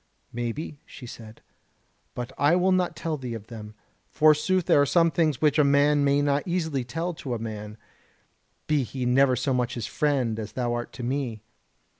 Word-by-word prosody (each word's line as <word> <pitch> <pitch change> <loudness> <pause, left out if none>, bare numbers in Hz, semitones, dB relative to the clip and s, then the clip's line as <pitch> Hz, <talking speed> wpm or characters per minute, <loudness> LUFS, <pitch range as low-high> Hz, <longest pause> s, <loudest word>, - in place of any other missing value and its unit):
"Maybe," 120 +5 -4
she 135 - -11
said, 115 -2 -11 0.7
"but 125 +1 -5
I 145 +5 +3
will 185 +1 +3
not 180 -2 +1
tell 160 -1 -3
thee 125 -4 -5
of 110 -2 -8
them. 110 -2 -9 0.3
Forsooth 155 +4 +3
there 145 - +5
are - - +4
some 165 +2 +3
things 155 -4 +1
which 150 0 +3
a - - +6
man 145 +1 +4
may 140 +1 +3
not 145 0 +2
easily 160 -7 -1
tell 165 +9 -3
to 130 -6 -5
a - - -2
man, 105 -1 -6 0.9
be 150 -2 +2
he 130 0 -4
never 130 +1 +4
so 125 +2 0
much 125 -1 -1
his 120 -3 -3
friend 130 -7 0
as 105 -1 -6
thou 120 -2 -1
art 120 0 -4
to 125 - -7
me. 120 -4 -3
140 Hz, 190 wpm, -26 LUFS, 120-150 Hz, 0.9 s, a